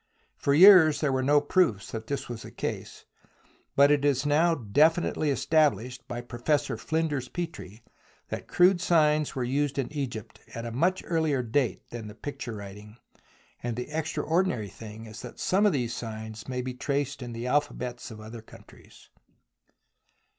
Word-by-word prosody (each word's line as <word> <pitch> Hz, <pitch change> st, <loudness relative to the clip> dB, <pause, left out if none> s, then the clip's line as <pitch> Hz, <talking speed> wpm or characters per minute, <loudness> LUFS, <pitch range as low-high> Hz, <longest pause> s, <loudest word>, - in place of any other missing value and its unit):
For 140 Hz, -, +1 dB
years 175 Hz, -3 st, +8 dB
there 150 Hz, -3 st, +1 dB
were 130 Hz, 0 st, +1 dB
no 145 Hz, +3 st, +4 dB
proofs 145 Hz, -, +1 dB
that 110 Hz, -1 st, -6 dB
this 140 Hz, -2 st, -3 dB
was 120 Hz, -2 st, -6 dB
the -, -, -9 dB
case, -, -, -6 dB, 0.7 s
but 140 Hz, +1 st, +6 dB
it 145 Hz, -1 st, +2 dB
is 145 Hz, -1 st, +2 dB
now 160 Hz, +3 st, +3 dB
definitely 150 Hz, -, +2 dB
established 130 Hz, -5 st, +1 dB
by 120 Hz, -2 st, -5 dB
Professor 130 Hz, +5 st, -1 dB
Flinders 155 Hz, -6 st, -2 dB
Petrie 115 Hz, -, -6 dB, 0.5 s
that -, -, -5 dB
crude 180 Hz, 0 st, +4 dB
signs 155 Hz, -4 st, +2 dB
were 130 Hz, -, -1 dB
used 140 Hz, +3 st, -1 dB
in 135 Hz, +1 st, -2 dB
Egypt 125 Hz, -7 st, -5 dB, 0.2 s
at 115 Hz, 0 st, -5 dB
a 115 Hz, -, -4 dB
much 175 Hz, +10 st, +1 dB
earlier 160 Hz, -6 st, 0 dB
date 125 Hz, +2 st, -1 dB
than 115 Hz, -2 st, -6 dB
the 105 Hz, -, -10 dB
picture 125 Hz, -1 st, -6 dB
writing, 105 Hz, +2 st, -10 dB, 0.6 s
and 120 Hz, -1 st, -3 dB
the 125 Hz, +5 st, -6 dB
extraordinary 160 Hz, -, -1 dB
thing 110 Hz, +2 st, -10 dB
is 110 Hz, +1 st, -10 dB
that 125 Hz, -, -10 dB
some 200 Hz, +3 st, +3 dB
of -, -, +3 dB
these 120 Hz, -6 st, -1 dB
signs 110 Hz, -1 st, -7 dB
may 125 Hz, -1 st, -3 dB
be 130 Hz, 0 st, -4 dB
traced 140 Hz, +1 st, -2 dB
in 120 Hz, -1 st, -6 dB
the 115 Hz, +1 st, -5 dB
alphabets 125 Hz, -3 st, -2 dB
of 110 Hz, -2 st, -10 dB
other 110 Hz, +2 st, -9 dB
countries. 110 Hz, -, -17 dB
130 Hz, 165 wpm, -27 LUFS, 115-150 Hz, 0.7 s, years